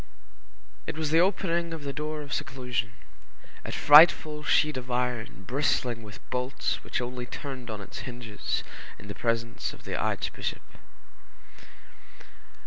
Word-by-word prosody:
It - - -4
was 155 -2 -1
the 165 - +5
opening 170 -3 +1
of 155 - -8
the 140 -1 -3
door 150 +1 -3
of 140 - -6
seclusion, 125 -4 -2 0.7
a - - -5
frightful 150 0 +7
sheet 150 +1 +3
of 130 0 -5
iron 120 -5 -2
bristling 125 -1 0
with 105 -1 -12
bolts 125 +1 -1
which - - -2
only 125 0 -4
turned 130 -2 -6
on 110 -2 -4
its 100 - -8
hinges 120 -4 -4 0.3
in 105 - -12
the - - -3
presence 115 +1 -1
of - - -14
the - - -4
archbishop. - - -2
125 Hz, 135 wpm, -28 LUFS, 115-150 Hz, 0.7 s, frightful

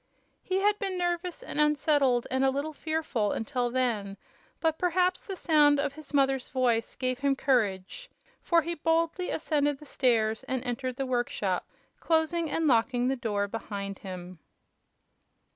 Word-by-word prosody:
He 375 - -1
had 415 +1 +2
been 385 -2 -2
nervous 350 0 -2
and 300 - -1
unsettled 290 -4 +3
and 260 +1 +1
a 270 - +5
little 285 +4 -2
fearful 305 -10 -1
until 245 +1 -1
then, 230 -6 -1 0.4
but 320 -1 0
perhaps 365 +1 +1
the 390 - -6
sound 295 -5 +4
of 280 -1 -1
his 305 0 -12
mother's 270 -2 +1
voice 240 -3 0
gave 255 -1 -1
him 280 -1 +2
courage, 245 - 0 0.3
for 335 -2 +3
he 340 +3 -2
boldly 330 +3 0
ascended 290 -3 0
the 300 - -14
stairs 225 -5 +1
and 260 -1 -2
entered 255 0 -3
the 270 - -2
workshop, 240 -7 -1 0.3
closing 325 0 +1
and 325 +2 0
locking 245 -1 +2
the 270 - +1
door 210 -5 -1
behind 200 -2 -5
him. 180 -2 -8
270 Hz, 155 wpm, -28 LUFS, 240-320 Hz, 0.4 s, a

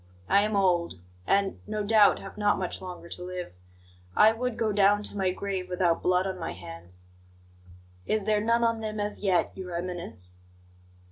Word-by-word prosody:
I 200 - +5
am 210 0 0
old, 180 -3 +2 0.3
and, 200 0 +2
no 210 0 -2
doubt, 210 -1 +5
have 195 - -9
not 205 -1 +2
much 185 -2 -3
longer 180 -2 -8
to 180 - -7
live. 180 - -6 0.6
I 215 - +7
would 245 0 -3
go 220 -2 +1
down 205 +1 +4
to 205 - -7
my 190 -2 +1
grave 185 -1 -3
without 180 -2 +1
blood 180 +1 +2
on 190 -1 -3
my 165 - -4
hands." 85 +1 -10 1.0
"Is 215 -1 +1
there 210 0 +2
none 230 +2 +2
on 230 -1 +2
them 215 -1 -4
as 205 0 -3
yet, 185 -4 +2
Your 180 -2 -6
Eminence?" 170 - -4
195 Hz, 180 wpm, -28 LUFS, 180-210 Hz, 1.0 s, I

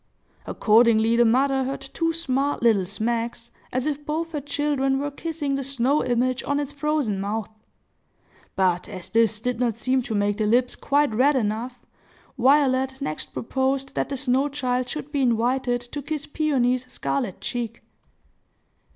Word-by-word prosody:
Accordingly, 225 0 +4
the 240 0 +5
mother 265 +3 +3
heard 270 +1 -4
two 330 +5 -1
smart 285 -5 -1
little 210 -6 +3
smacks, 230 +3 -3 0.2
as 255 +1 -1
if 295 -1 -2
both 320 +2 -3
her 300 -3 -3
children 285 -2 0
were 285 +1 -2
kissing 305 -1 -3
the 275 0 -1
snow 275 +2 +1
image 250 +1 +1
on 285 0 0
its 290 0 -4
frozen 285 -8 0
mouth. 210 +2 -3 1.0
But, 180 -2 +1
as 185 -2 -8
this 225 -2 +3
did 245 +1 -2
not 240 -3 +1
seem 255 +3 +1
to 230 -3 -4
make 205 0 +1
the 215 -1 0
lips 245 +3 +2
quite 285 -3 +1
red 270 +6 +4
enough, 240 +1 -2 0.5
Violet 265 0 +3
next 155 - -3
proposed 265 +2 -1
that - - -1
the 275 - -3
snow 265 +2 +1
child 255 -3 -1
should 300 -2 -6
be 285 -2 0
invited 245 +1 +1
to 245 +4 -7
kiss 300 +1 -4
Peony's 255 -5 0
scarlet 245 -10 -2
cheek. 235 -2 -4
255 Hz, 160 wpm, -24 LUFS, 230-280 Hz, 1.0 s, the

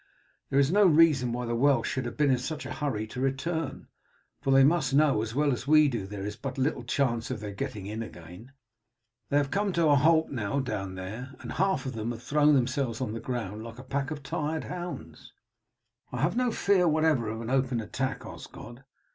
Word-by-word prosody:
There 135 - 0
is 140 +2 +4
no 205 +2 +5
reason 150 -7 +4
why 125 +1 -3
the 120 - -2
Welsh 130 0 +3
should 130 -2 -2
have 120 - -6
been 145 -2 +3
in 130 - +2
such 155 +4 -5
a - - -5
hurry 125 -8 -2
to 125 +4 -6
return, 135 +3 -2 0.5
for - - -2
they 135 0 +6
must 140 -2 +3
know 145 -7 +4
as 115 +1 -4
well 145 0 +2
as 125 +2 -5
we 155 0 +6
do 115 -8 -3
that - - -14
there 100 -1 -5
is 105 0 -4
but 135 +3 -6
little 135 +3 0
chance 120 -5 0
of 130 -4 -3
their 105 -1 -6
getting 115 -3 -5
in 110 +3 -4
again. 90 +3 -10 0.8
They 145 - +2
have 140 -1 +1
come 200 0 +1
to 170 -3 +3
a 145 - +6
halt 160 +3 +3
now 120 0 -1
down 105 -7 -3
there, 110 +9 -7
and - - -7
half 190 -3 0
of 130 - -3
them 115 0 -3
have 120 0 -6
thrown 150 +2 +4
themselves 130 -2 0
on 125 -5 -2
the 115 - -4
ground 110 -3 -4
like 115 0 -9
a 130 - -9
pack 135 +2 -2
of 150 -2 -6
tired 155 +3 -2
hounds." 175 -1 -7 0.8
"I - - -3
have - - +1
no 250 -1 +1
fear 195 -5 +3
whatever 155 -7 +2
of 110 +1 -4
an 115 +1 -5
open 130 -2 +1
attack, 130 +4 -3
Osgod. 120 +3 -10
135 Hz, 225 wpm, -28 LUFS, 115-150 Hz, 0.8 s, they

